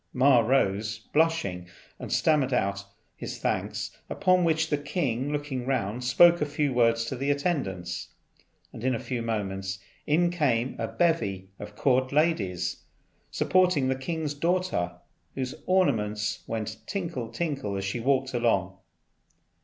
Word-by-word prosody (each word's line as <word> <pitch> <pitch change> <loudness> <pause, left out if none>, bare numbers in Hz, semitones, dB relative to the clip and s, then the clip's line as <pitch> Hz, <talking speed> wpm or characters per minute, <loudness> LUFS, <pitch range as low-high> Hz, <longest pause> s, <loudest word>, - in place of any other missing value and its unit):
Ma 130 -1 +5
rose 110 -3 +1 0.2
blushing, 145 - +1 0.3
and - - -7
stammered 150 -4 +2
out 100 -4 0 0.3
his - - -6
thanks; - - -2
upon 185 -2 +3
which 160 -1 +1
the 150 - +3
king 145 -3 -1
looking 145 -4 -3
round 125 -2 -1
spoke 170 +8 +6
a - - +3
few 145 -1 0
words 115 -1 +3
to 125 - -4
the 135 +3 -2
attendants, 95 - -1 0.7
and 110 - -9
in 130 -1 +2
a - - -3
few 125 -2 -3
moments 95 -4 -3 0.3
in 170 +4 +3
came 130 -7 +1
a 115 - -1
bevy 105 - 0
of 105 0 -9
court 130 +1 +2
ladies 100 - 0 0.5
supporting 180 -8 +2
the 130 - +1
king's 150 +3 -3
daughter, 165 - 0 0.4
whose 130 -1 -3
ornaments 105 - +1
went 110 -1 -3
tinkle, 170 - -3
tinkle, 135 -8 -2
as 95 - -3
she 100 +5 -2
walked 130 +1 +1
along. 100 -6 +1
130 Hz, 140 wpm, -27 LUFS, 105-150 Hz, 0.7 s, spoke